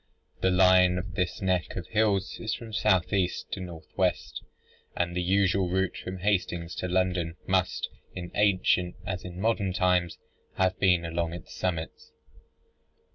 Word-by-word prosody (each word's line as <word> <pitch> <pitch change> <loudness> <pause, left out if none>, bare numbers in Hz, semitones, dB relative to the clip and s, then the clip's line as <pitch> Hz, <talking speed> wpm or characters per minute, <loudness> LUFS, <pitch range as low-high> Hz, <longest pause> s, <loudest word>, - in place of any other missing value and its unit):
The 95 - +3
line 90 -1 +5
of 90 -1 -5
this 90 +2 -2
neck 95 -3 0
of 90 - -4
hills 105 -4 +1
is 110 - -2
from 115 -2 -9
south 95 -3 +2
east 95 -3 -1
to - - -3
north 85 -3 -8
west, - - 0 0.6
and 85 0 -1
the 90 - 0
usual 95 0 +2
route 95 +1 0
from 95 +1 -6
Hastings 90 -3 -1
to 90 - -2
London 90 -2 0
must, 95 -1 +1 0.3
in 90 -1 -6
ancient 95 -3 +2
as 95 -1 -3
in 90 0 -8
modern 105 -3 +1
times, 90 -2 +1 0.4
have 95 0 +1
been 90 -3 +3
along 85 0 -2
its 85 - -9
summits. 85 -3 -4
90 Hz, 155 wpm, -28 LUFS, 90-95 Hz, 0.6 s, line